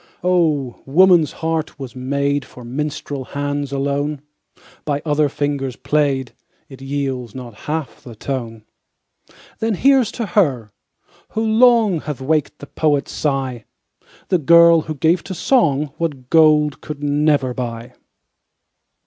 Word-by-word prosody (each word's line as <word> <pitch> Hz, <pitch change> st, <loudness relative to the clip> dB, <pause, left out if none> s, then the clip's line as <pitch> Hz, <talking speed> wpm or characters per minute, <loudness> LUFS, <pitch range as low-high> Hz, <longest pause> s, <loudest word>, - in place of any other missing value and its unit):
Oh! 155 Hz, -8 st, +1 dB
woman's 175 Hz, +1 st, +5 dB
heart 160 Hz, -2 st, -2 dB
was 135 Hz, -3 st, -8 dB
made 140 Hz, +2 st, -1 dB
For 125 Hz, -, -13 dB
minstrel 145 Hz, +1 st, -4 dB
hands 145 Hz, 0 st, -3 dB
alone; 140 Hz, +1 st, -2 dB, 0.6 s
By 145 Hz, -1 st, -2 dB
other 150 Hz, -1 st, +2 dB
fingers 140 Hz, -3 st, -2 dB
played, 140 Hz, -3 st, 0 dB, 0.4 s
It 135 Hz, -1 st, -12 dB
yields 135 Hz, -4 st, -4 dB
not 125 Hz, -3 st, -8 dB, 0.2 s
half 155 Hz, -2 st, -4 dB
the 120 Hz, -3 st, -11 dB
tone. 115 Hz, -2 st, -5 dB, 1.0 s
Then 220 Hz, -1 st, 0 dB
here's 265 Hz, +1 st, +3 dB
to 235 Hz, -, -3 dB
her, 135 Hz, -, +1 dB, 0.7 s
who 220 Hz, -, +1 dB
long 220 Hz, -4 st, +4 dB
Hath 150 Hz, -3 st, -5 dB
waked 150 Hz, +2 st, -1 dB
the -, -, -10 dB
poet's 145 Hz, -1 st, 0 dB
sigh, 135 Hz, -5 st, -2 dB, 0.6 s
The 180 Hz, -, +2 dB
girl 170 Hz, +2 st, +6 dB
who 155 Hz, 0 st, -6 dB
gave 165 Hz, +5 st, +2 dB
to 190 Hz, -, -6 dB
song 150 Hz, -, +1 dB
What 140 Hz, -7 st, -4 dB
gold 150 Hz, -3 st, +4 dB
could 150 Hz, -1 st, -7 dB
never 145 Hz, -2 st, +1 dB
buy. 120 Hz, 0 st, -6 dB
145 Hz, 130 wpm, -19 LUFS, 135-160 Hz, 1.0 s, girl